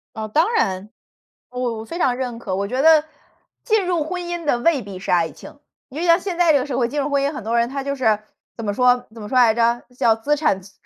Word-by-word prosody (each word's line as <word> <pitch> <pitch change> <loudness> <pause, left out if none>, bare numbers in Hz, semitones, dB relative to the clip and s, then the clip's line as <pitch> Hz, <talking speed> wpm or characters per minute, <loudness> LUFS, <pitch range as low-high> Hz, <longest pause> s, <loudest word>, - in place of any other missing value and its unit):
哦， 220 0 -4
当 315 - +2
然， 195 - 0 0.6
我 250 -3 -3
我 220 - -7
非 335 - -6
常 250 -6 +2
认 245 -3 -4
可。 190 -5 -4
我 200 +1 -2
觉 255 +4 -1
得 315 0 +6 0.6
进 440 -5 +1
入 345 -4 0
婚 360 +3 -4
姻 345 -1 -5
的 265 - +2
未 290 0 +2
必 195 -3 -9
是 - - -4
爱 170 -2 +2
情， - - -14 0.3
因 280 +4 -7
为 350 - -1
像 335 +1 +5
现 360 -2 -5
在 345 -2 +4
这 285 - +4
个 255 - -2
社 270 -4 -3
会 240 -2 +1
进 290 +4 -3
入 280 - -1
婚 280 -1 +1
姻， 285 - 0
很 245 - -7
多 230 +2 -1
人 235 0 +2
他 275 +1 -4
就 280 0 -2
是， 220 -6 +2 0.4
怎 230 - -6
么 205 - -1
说 250 +1 +2
怎 225 - -11
么 210 - -7
说 255 - -3
来 235 -3 +6
着， 235 +1 +1
叫 225 -1 +3
资 285 +7 0
产 280 -11 0
重 195 - -16
255 Hz, 295 characters per minute, -21 LUFS, 225-310 Hz, 0.6 s, 得